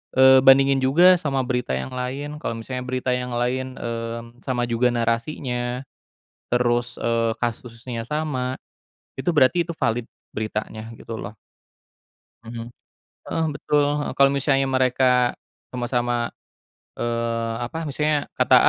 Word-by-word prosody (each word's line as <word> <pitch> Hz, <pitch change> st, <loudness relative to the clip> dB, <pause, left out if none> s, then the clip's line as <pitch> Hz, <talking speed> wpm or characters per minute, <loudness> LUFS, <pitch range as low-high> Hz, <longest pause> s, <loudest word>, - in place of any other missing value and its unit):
eee, 130 Hz, 0 st, +8 dB
bandingin 135 Hz, 0 st, +6 dB
juga 175 Hz, +8 st, +6 dB
sama 135 Hz, -4 st, 0 dB
berita 125 Hz, -, -1 dB
yang 65 Hz, -, -4 dB
lain, 135 Hz, +4 st, -4 dB
kalo 115 Hz, -, -3 dB
misalnya 125 Hz, +2 st, -5 dB
berita 130 Hz, 0 st, -1 dB
yang 125 Hz, 0 st, -3 dB
lain, 130 Hz, +2 st, -1 dB
mmm, 115 Hz, 0 st, -5 dB
sama 125 Hz, -2 st, -1 dB
juga 120 Hz, +1 st, +2 dB
narasinya, 120 Hz, +1 st, -1 dB, 0.7 s
terus, 120 Hz, 0 st, +1 dB
eee, 115 Hz, -1 st, +1 dB
kasusnya 115 Hz, 0 st, -4 dB
sama 135 Hz, -4 st, -2 dB, 0.7 s
itu -, -, -4 dB
berarti 160 Hz, +4 st, +4 dB
itu -, -, -2 dB
valid, 120 Hz, -3 st, 0 dB, 0.3 s
beritanya 110 Hz, 0 st, -4 dB
gitu 115 Hz, -, -7 dB
loh. 105 Hz, +1 st, -8 dB, 1.1 s
Mhm, 115 Hz, 0 st, -7 dB, 0.6 s
heeh, 165 Hz, 0 st, -1 dB
betul, 145 Hz, 0 st, +1 dB, 0.2 s
heeh. -, -, -3 dB
Kalo 140 Hz, 0 st, +6 dB
misalnya 135 Hz, 0 st, +2 dB
mereka 125 Hz, -1 st, +3 dB, 0.4 s
sama-sama, 120 Hz, -1 st, -1 dB, 0.7 s
eee, 115 Hz, -1 st, -1 dB
apa, 160 Hz, +7 st, -7 dB
maksudnya 150 Hz, +1 st, +1 dB, 0.2 s
kata -, -, +5 dB
125 Hz, 125 wpm, -23 LUFS, 115-135 Hz, 1.1 s, eee